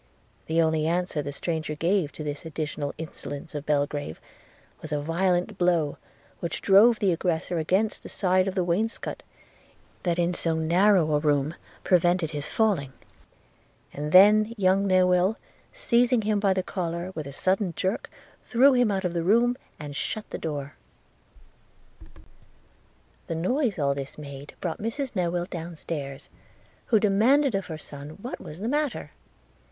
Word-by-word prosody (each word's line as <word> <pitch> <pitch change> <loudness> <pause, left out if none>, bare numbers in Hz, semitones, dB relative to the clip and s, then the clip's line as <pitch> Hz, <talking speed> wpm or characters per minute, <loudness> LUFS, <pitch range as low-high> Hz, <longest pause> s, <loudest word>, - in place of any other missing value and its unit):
The 160 +1 +1
only 160 -1 +1
answer 175 -2 0
the 145 0 -5
stranger 155 +1 -3
gave 170 -1 +1
to 155 - -7
this 145 -1 -4
additional 150 -2 -4
insolence 155 -1 -8
of 145 0 -6
Belgrave 145 - -1 0.6
was 155 - -8
a 150 - 0
violent 180 +5 0
blow, 170 -5 +2 0.4
which 170 - -3
drove 215 +4 +6
the 200 -3 +2
aggressor 170 0 -1
against 190 +7 0
the - - -10
side 185 -1 +1
of 190 - -2
the 185 - +1
wainscot, 195 +7 -2 0.8
that 175 -2 0
in 175 0 +1
so 165 -2 +2
narrow 170 0 +3
a 150 - +3
room 145 0 +1 0.3
prevented 175 -2 +2
his 145 -2 -3
falling; 185 -12 0 1.0
and 150 +1 -4
then 210 +5 +6
young 195 0 +3
Newill, 185 +2 +3 0.4
seizing 245 - +2
him 210 0 +1
by 200 -1 +2
the 185 - 0
collar, 175 -1 -4
with 155 -5 -5
a - - -7
sudden 185 +6 0
jerk 190 +4 -2 0.3
threw 265 +4 +5
him 245 -3 +3
out 195 -2 -1
of 175 - -1
the 170 - 0
room, 235 +7 +3 0.2
and 145 -2 -7
shut 215 +8 -3
the - - -4
door. 145 -3 -4 2.5
The 165 - -3
noise 225 - 0
all 140 -3 +1
this 140 -1 -6
made 140 -1 -9
brought 170 -3 -3
Mrs 250 +4 -3
Newill 175 -1 -1
down 170 -1 -6
stairs, 140 -4 -6 0.6
who 220 - +4
demanded 230 +7 +3
of 195 -1 -2
her 160 - -5
son 145 0 -9
what 250 - -5
was 150 - -9
the 220 - -2
matter? 290 +1 -1
175 Hz, 155 wpm, -26 LUFS, 155-200 Hz, 2.5 s, drove